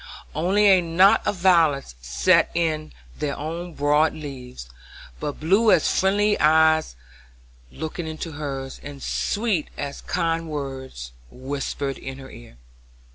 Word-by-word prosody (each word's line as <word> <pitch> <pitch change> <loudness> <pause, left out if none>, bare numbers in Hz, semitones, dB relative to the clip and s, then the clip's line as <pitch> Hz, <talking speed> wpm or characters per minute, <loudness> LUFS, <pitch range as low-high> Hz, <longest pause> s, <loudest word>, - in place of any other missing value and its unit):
Only 190 +7 +2
a 190 -3 +6
knot 175 +3 +4
of - - +1
violets 165 - +3
set - - +3
in 155 -2 -1 0.3
their 150 -2 -2
own 165 +3 -5
broad 150 +2 +2
leaves, 130 - -9 0.5
but 145 - -4
blue 195 +8 +3
as - - +3
friendly 205 +2 +2
eyes 160 - +4 0.8
looking 160 +2 -5
into 160 +1 -5
hers, 135 -3 -6
and 145 -1 -9
sweet 205 -7 -1
as 140 0 -5
kind 165 -2 -1
words 130 - -6 0.2
whispered 135 - -4
in 135 0 -7
her 135 -1 -11
ear. 115 - -14
155 Hz, 130 wpm, -23 LUFS, 135-170 Hz, 0.8 s, a